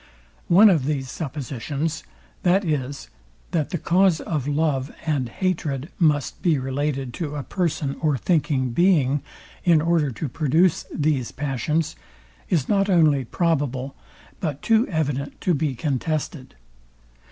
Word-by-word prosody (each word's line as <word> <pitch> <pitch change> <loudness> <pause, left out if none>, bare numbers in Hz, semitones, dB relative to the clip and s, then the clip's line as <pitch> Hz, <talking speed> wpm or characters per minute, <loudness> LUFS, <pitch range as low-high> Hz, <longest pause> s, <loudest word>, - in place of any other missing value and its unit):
One 200 +4 +7
of 155 -8 +1
these 135 -3 -2
suppositions, 145 +1 -4 0.4
viz, 155 -8 0 0.4
that 160 -5 0
the 180 - -2
cause 180 +1 +3
of 150 -5 -3
love 145 -2 0
and 140 -6 0
hatred 155 -2 -2
must 150 -6 +1
be 165 -4 +3
related 135 -1 -2
to 150 -3 -3
a 145 - -3
person 155 -6 -1
or 150 -4 +1
thinking 140 -4 +1
being, 145 -3 +3 0.4
in 170 -3 +5
order 160 -2 +2
to 130 +5 -4
produce 155 +6 +2
these 145 -5 0
passions, 145 +3 -1 0.5
is 155 -7 +1
not 200 -1 +2
only 155 -7 +4
probable, 140 -4 -1 0.4
but 150 -5 -3
too 225 +2 +3
evident 145 -5 -2
to 180 - +2
be 145 -3 -1
contested. 140 0 -3
150 Hz, 130 wpm, -23 LUFS, 135-165 Hz, 0.5 s, One